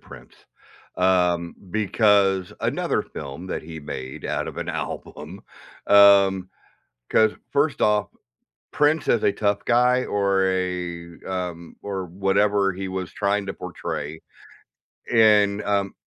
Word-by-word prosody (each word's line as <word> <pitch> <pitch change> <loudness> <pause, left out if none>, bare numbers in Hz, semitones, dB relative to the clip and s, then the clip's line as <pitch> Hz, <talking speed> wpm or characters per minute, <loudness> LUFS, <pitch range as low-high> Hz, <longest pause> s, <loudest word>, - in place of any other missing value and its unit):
Prince, - - -14 0.6
um, 90 -2 +1 0.2
because 100 -3 +2
another - - 0
film 70 +6 -8
that - - -4
he 80 0 -9
made 65 -3 -7
out - - -2
of - - -8
an - - -5
album 80 +7 -6 0.4
Um, 100 -2 +5 0.6
'cause 110 -1 +3 0.2
first 145 +1 +1
off, 105 -1 +2 0.6
Prince 150 0 +2
as 115 - +2
a - - +4
tough 100 -1 -1
guy 125 +1 +3
or 100 -1 +1
a, 90 -2 -3
um, 90 -3 -5
or 95 -2 -4
whatever 95 +2 +1
he 95 +1 -5
was 95 -1 -5
trying 100 0 -1
to - - -4
portray 80 +1 -6 0.9
in, 105 -3 +4
um 100 -1 -1
95 Hz, 125 wpm, -23 LUFS, 90-105 Hz, 0.9 s, Um